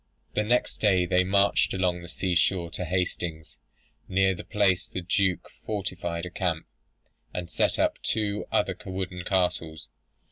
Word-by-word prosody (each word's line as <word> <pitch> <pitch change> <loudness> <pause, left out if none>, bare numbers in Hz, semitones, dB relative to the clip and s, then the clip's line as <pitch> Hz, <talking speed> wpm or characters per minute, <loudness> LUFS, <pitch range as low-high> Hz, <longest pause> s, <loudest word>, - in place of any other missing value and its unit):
"The - - +2
next 120 +3 +1
day 95 -4 +3
they 90 +1 +3
marched 100 +1 +3
along 90 -2 +1
the 85 - -9
sea 90 +1 -1
shore 85 0 +2
to 90 - -3
Hastings. 85 -3 -2 0.5
Near 95 0 +3
that 90 - -9
place 95 -4 +2
the 95 - -4
Duke 95 +1 0
fortified 90 -5 -3
a 90 - -7
camp, 85 -3 -1 0.7
and 90 -1 -4
set - - +2
up - - +1
the - - -6
two 105 -1 0
other 95 -3 +1
wooden 95 -2 -4
castles. 85 -6 0
90 Hz, 155 wpm, -27 LUFS, 85-95 Hz, 0.7 s, day